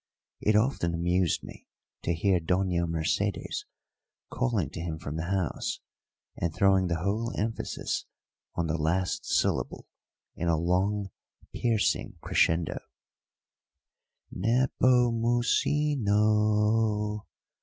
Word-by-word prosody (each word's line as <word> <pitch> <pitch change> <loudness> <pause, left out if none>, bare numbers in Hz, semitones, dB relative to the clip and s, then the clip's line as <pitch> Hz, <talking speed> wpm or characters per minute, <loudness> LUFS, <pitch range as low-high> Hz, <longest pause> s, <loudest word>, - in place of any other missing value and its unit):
It 105 - +2
often 105 -7 +1
amused 90 +1 +1
me - - -11 0.3
to 85 - 0
hear 90 +2 +2
Doña 90 0 0
Mercedes 80 -2 -1 0.7
calling 60 - 0
to - - -6
him 85 -2 -3
from 75 -1 -6
the 80 +1 -3
house, 95 -5 -1 0.6
and 85 - -1
throwing 95 +1 +3
the 85 -1 -2
whole 110 +5 -1
emphasis 110 +2 -2 0.5
on 85 - 0
the 80 0 -1
last 90 +4 0
syllable - - 0 0.5
in 85 - -3
a 85 -1 +3
long, 95 +4 0 0.4
piercing 115 -4 0
crescendo: 80 0 +1 1.5
"Ne 115 +7 +2 0.2
po 125 -1 +5
mu 120 +1 +1
ci 150 +4 +2
no 105 -5 +1
o." 105 0 +2
95 Hz, 115 wpm, -28 LUFS, 85-110 Hz, 1.5 s, po